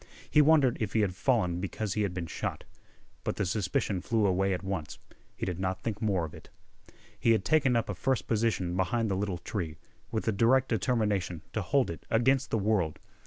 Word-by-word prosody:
He 150 Hz, -, +5 dB
wondered 145 Hz, -4 st, +4 dB
if 110 Hz, -3 st, -2 dB
he 110 Hz, -, +3 dB
had 100 Hz, -3 st, +1 dB
fallen 95 Hz, -6 st, +1 dB
because 100 Hz, +1 st, -3 dB
he 105 Hz, -, 0 dB
had 100 Hz, -3 st, 0 dB
been 90 Hz, -1 st, -4 dB
shot. -, -, -4 dB, 0.6 s
But -, -, -2 dB
the 100 Hz, -, -1 dB
suspicion 95 Hz, 0 st, -1 dB
flew 110 Hz, +2 st, +1 dB
away 95 Hz, 0 st, +2 dB
at 95 Hz, 0 st, -2 dB
once. 95 Hz, -6 st, -4 dB, 0.4 s
He -, -, -3 dB
did 90 Hz, -2 st, -3 dB
not 95 Hz, 0 st, -1 dB
think 110 Hz, -3 st, -3 dB
more 95 Hz, -6 st, +1 dB
of 80 Hz, -, -9 dB
it. -, -, -13 dB, 0.7 s
He 115 Hz, -, +4 dB
had 110 Hz, -4 st, 0 dB
taken 140 Hz, -5 st, +3 dB
up 115 Hz, -, +1 dB
a 100 Hz, -, -2 dB
first 130 Hz, +7 st, 0 dB
position 105 Hz, -6 st, 0 dB
behind 110 Hz, +4 st, 0 dB
the -, -, +1 dB
little 95 Hz, -2 st, -2 dB
tree, 85 Hz, -4 st, -4 dB, 0.3 s
with 110 Hz, -, -3 dB
a -, -, +4 dB
direct 120 Hz, +6 st, +3 dB
determination 105 Hz, -7 st, 0 dB
to 110 Hz, -, -1 dB
hold 130 Hz, +3 st, +1 dB
it 85 Hz, -, -10 dB
against 130 Hz, +4 st, +2 dB
the -, -, +1 dB
world. 100 Hz, -7 st, +1 dB
105 Hz, 210 wpm, -29 LUFS, 95-115 Hz, 0.7 s, He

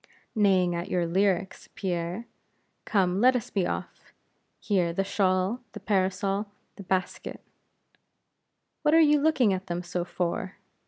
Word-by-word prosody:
"Neighing 190 Hz, -5 st, +3 dB
at 170 Hz, 0 st, -4 dB
your 175 Hz, -1 st, +1 dB
lyrics, 190 Hz, +2 st, 0 dB
Pierre. 180 Hz, +3 st, -3 dB, 0.6 s
Come, 190 Hz, -2 st, +1 dB
let 255 Hz, +1 st, +6 dB
us 240 Hz, -, -3 dB
be 190 Hz, -4 st, +1 dB
off. -, -, -6 dB, 0.5 s
Here, 180 Hz, -5 st, +1 dB
the 195 Hz, -, 0 dB
shawl, 195 Hz, +2 st, +1 dB
the -, -, -7 dB
parasol, 195 Hz, +1 st, 0 dB, 0.3 s
the -, -, -10 dB
basket: 185 Hz, 0 st, -2 dB, 1.4 s
what 305 Hz, 0 st, +3 dB
are -, -, +7 dB
you 300 Hz, -2 st, +5 dB
looking 270 Hz, -9 st, +3 dB
at 190 Hz, 0 st, -4 dB
them 175 Hz, 0 st, -3 dB
so 175 Hz, 0 st, -2 dB
for?" 180 Hz, +2 st, -3 dB
190 Hz, 140 wpm, -27 LUFS, 180-210 Hz, 1.4 s, are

